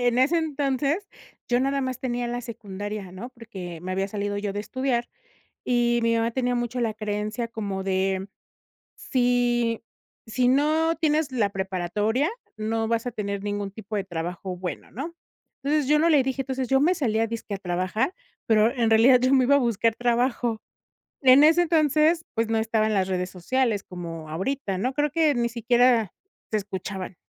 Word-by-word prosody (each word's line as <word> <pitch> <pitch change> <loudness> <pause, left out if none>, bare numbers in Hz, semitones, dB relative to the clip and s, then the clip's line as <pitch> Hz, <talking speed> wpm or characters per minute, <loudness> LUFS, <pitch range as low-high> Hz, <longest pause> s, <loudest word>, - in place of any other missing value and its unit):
en 245 0 +2
ese 300 +7 +4
entonces, 295 +4 -1 0.4
yo 245 0 +2
nada 275 +1 +1
más 260 -1 -3
tenía 245 -1 -2
la 240 +1 -3
secundaria, 205 -4 -6
¿no? 200 +7 -7
Porque 190 -9 -9
me 185 +1 -4
había 195 +1 -1
salido 205 0 -3
yo 205 -1 -3
de 205 - -3
estudiar, 240 +2 -1 0.6
y 240 -1 +2
mi 230 0 +2
mamá 230 +1 +1
tenía 250 0 0
mucho 240 +1 -2
la 225 -2 0
creencia 215 +2 -3
como 200 -4 -4
de 190 0 0 0.7
"si 245 -2 +1 0.4
si 245 +3 +1
no 310 +5 +3
tienes 310 -2 +1
la 225 -5 +2
preparatoria, 195 - -1 0.3
no 225 +1 -1
vas 230 +1 0
a - - 0
tener 200 -2 -3
ningún 205 -1 -2
tipo 215 +1 -8
de 200 - -1
trabajo 180 +1 -5
bueno", 180 0 -6
¿no? 300 +9 -6 0.5
Entonces, 290 -1 +1
yo 300 0 +5
no 330 - +3
le 300 -4 +5
dije, 265 +1 -2
entonces, 260 -1 -3
yo 270 +2 +3
me 350 +5 +4
salía 225 -7 +1
dizque 225 -2 -5
a - - -4
trabajar, 185 - -1 0.3
pero 220 +1 +4
en 235 -4 +1
realidad 240 +3 +6
yo 255 +1 +2
me 260 -1 +5
iba 280 +2 +5
a - - +5
buscar 230 -3 +1
trabajo. 240 -1 0 0.6
En 265 +1 +7
ese 330 +3 +5
entonces, 315 0 +3
pues, 225 0 0
no 225 - +1
estaban 220 -1 +1
las 190 -2 +1
redes 180 -1 -1
sociales 215 +4 0
como 165 -3 -7
ahorita, 195 - -2
¿no? 255 +7 -1
Creo 295 +2 +1
que 315 -1 +3
ni 240 -1 +1
siquiera 235 -2 +3 0.4
se 215 - +2
escuchaban. 190 -1 -5
230 Hz, 180 wpm, -25 LUFS, 205-260 Hz, 0.7 s, En